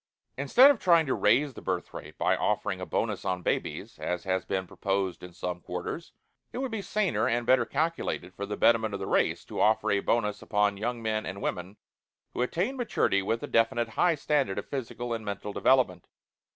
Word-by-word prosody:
Instead 245 - +6
of 270 - -2
trying 170 -3 +4
to 130 - 0
raise 145 -1 +3
the - - -10
birth 90 -2 -3
rate - - -9
by - - +2
offering - - -1
a - - -5
bonus - - -1
on 90 -1 -2
babies - - -3
as 90 -1 -3
has 95 -1 0
been 95 -1 -2
proposed 95 0 -2
in 90 - -9
some 90 0 -5
quarters, 90 - -5 0.4
it - - -7
would 265 -1 -2
be 220 -2 -3
saner 210 -1 0
and 120 0 0
better 125 -1 +4
calculated 150 - -2
for 100 +2 -5
the 105 - -4
betterment 110 -3 +3
of - - -5
the 95 - -4
race - - +1
to - - -4
offer 110 0 +3
a 100 - +3
bonus 105 0 0
upon 105 -1 +1
young 115 +3 -3
men 110 -1 -1
and 95 +1 -6
women 95 +1 -4 0.6
who - - -2
attained 185 - -1
maturity 215 - +1
with 115 +4 -2
a - - -3
definite 115 0 +2
high 170 +9 +2
standard 140 -8 0
of - - -4
physical 120 -2 -4
and 115 -1 -4
mental 100 0 -5
development. 110 -11 +2
110 Hz, 205 wpm, -28 LUFS, 95-140 Hz, 0.6 s, Instead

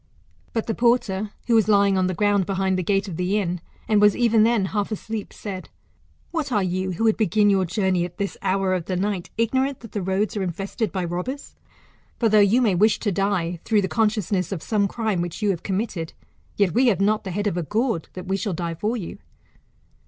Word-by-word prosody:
But 225 - -2
the 225 - -1
porter, 220 -4 +1 0.2
who 240 - +1
was 220 -2 +4
lying 200 -2 +4
on 185 -1 +2
the 185 - -2
ground 205 -1 +2
behind 190 -1 0
the 185 - 0
gate 195 +3 0
of 170 -4 -6
the 180 +3 0
inn, 180 -4 -2 0.3
and 210 -1 +3
was 210 -1 +5
even 230 -2 +4
then 225 -2 +3
half 205 0 -1
asleep, 215 0 -5
said. 190 -3 -7 0.6
What 310 -5 -2
are 205 -4 +2
you, 185 +1 -1
who 185 - -3
would 220 -1 +3
begin 210 -1 +3
your 190 -1 +2
journey 185 0 0
at 175 0 -6
this 200 -1 -2
hour 195 -1 +1
of 180 -3 -2
the 185 - -2
night, 195 -1 -2
ignorant 260 +4 0
that 230 - -11
the 205 - -3
roads 190 +4 -1
are 205 - -1
infested 195 +3 -3
by 185 0 -2
robbers? 180 +12 -5 0.6
For, 230 - +2
though 215 0 +5
you 210 +5 +4
may 210 -5 +3
wish 210 +4 +3
to 205 - -1
die, 180 -3 -1
through 215 -3 +2
the - - 0
consciousness 210 -4 0
of 180 -5 -4
some 205 -3 +1
crime 215 -5 -1
which 175 +4 -5
you 205 - +3
have 175 - -4
committed, 190 -5 -3 0.4
yet 200 -4 +2
we 250 +3 +4
have 205 -6 +3
not 210 +2 +2
the 195 - -5
head 205 +3 -2
of*a 180 -4 0
gounl, 215 - 0
that 185 0 -8
\ye 190 +1 0
shall 200 -1 -2
die 170 0 -3
for 215 +8 -2
you. 185 -7 -7
200 Hz, 225 wpm, -23 LUFS, 185-215 Hz, 0.6 s, was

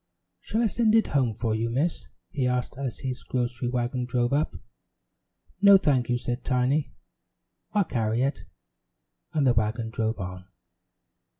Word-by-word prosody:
"Shall 225 +2 -1
I - - +3
send 225 +1 +2
it 225 - +5
home 130 -6 +1
for 115 0 -1
you, 115 +1 -1
Miss?" 145 +8 -1 0.2
he 135 -6 0
asked 125 0 -1
as 130 -3 -5
his 130 -3 -4
grocery 120 0 -2
wagon 125 +1 -1
drove 120 +1 0
up. 150 +2 0 1.1
"No, 200 -1 +9
thank 135 -9 +1
you," 120 - +2
said 120 +1 -4
Tiny, 130 +2 +1 0.8
"I'll 205 - +4
carry 115 -5 0
it," 140 +2 -2 0.9
and 150 -3 +1
the 125 - +5
wagon 110 +1 -1
drove 110 0 -1
on. 90 -1 -6
125 Hz, 155 wpm, -26 LUFS, 115-140 Hz, 1.1 s, No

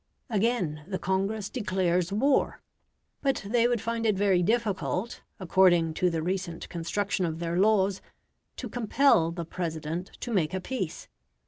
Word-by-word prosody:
Again, 200 -9 0
the 190 -1 -2
Congress 195 +3 -1
declares 185 -6 0
war, 265 +7 +2 0.6
but 270 -7 0
they 235 +2 +3
would 240 -1 +1
find 230 0 -2
it 215 -3 +2
very 195 -3 +3
difficult, 215 0 -1 0.2
according 175 -3 +4
to 180 +3 +1
the 165 -2 -2
recent 180 -1 -3
construction 185 +3 -2
of 160 -2 -1
their 170 0 -2
laws, 200 -2 +3 0.5
to - - -5
compel 245 -6 +3
the 170 0 -5
President 165 0 -4
to 240 - -3
make 180 -3 +1
a - - -1
peace. 190 -5 -4
190 Hz, 145 wpm, -28 LUFS, 170-220 Hz, 0.6 s, according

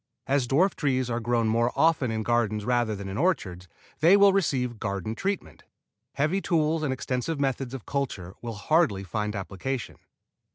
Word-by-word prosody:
As 135 -2 +1
dwarf 170 +9 +3
trees 130 -4 0
are 115 - 0
grown 120 -1 +1
more 115 +2 +2
often 160 -6 +3
in 110 0 -2
gardens 110 -3 0
rather 120 -3 +1
than 100 0 -7
in 95 +1 -4
orchards 95 - -1 0.3
they 175 +6 +6
will 200 -1 +6
receive 125 - 0
garden 100 +1 -3
treatment. 195 - -3 0.5
Heavy 155 +8 0
tools 160 -3 +1
and 150 -3 -1
extensive 130 +4 -2
methods 135 -2 -1
of 130 - -8
culture 115 -10 -3
will 115 -2 -5
hardly 105 - +2
find 105 +4 -3
application. 100 +6 -4
125 Hz, 165 wpm, -27 LUFS, 110-150 Hz, 0.5 s, they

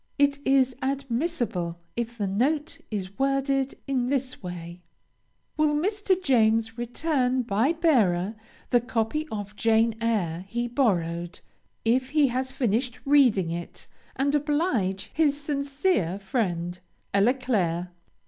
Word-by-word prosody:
It 285 -1 +3
is 265 -2 +3
admissible, 260 - -2 0.2
if 235 0 -3
the 205 - -1
note 280 +11 0
is 195 -3 -5
worded 275 0 +1
in 260 -3 0
this 265 -1 -2
way: 175 -1 -7 0.8
Will 305 -1 +3
Mr. 385 +3 +1
James 225 -7 +2
return 250 +1 0
by 230 +7 +1
bearer, 220 - +2 0.4
the 245 -2 +5
copy 240 +6 -1
of 205 -1 -5
"Jane 225 +1 +3
Eyre" 185 -7 0
he 240 +3 -2
borrowed, 175 -9 0 0.4
if 255 +3 +2
he 290 -2 +3
has 260 +2 -2
finished 245 -2 -1
reading 250 - +4
it, 170 0 -6 0.3
and 280 +2 +1
oblige 290 - 0
his 290 -3 +2
sincere 280 - 0
friend, 185 -4 -2 0.3
ELLA 205 +6 +4
CLAIRE. 180 -9 -1
245 Hz, 120 wpm, -26 LUFS, 200-280 Hz, 0.8 s, the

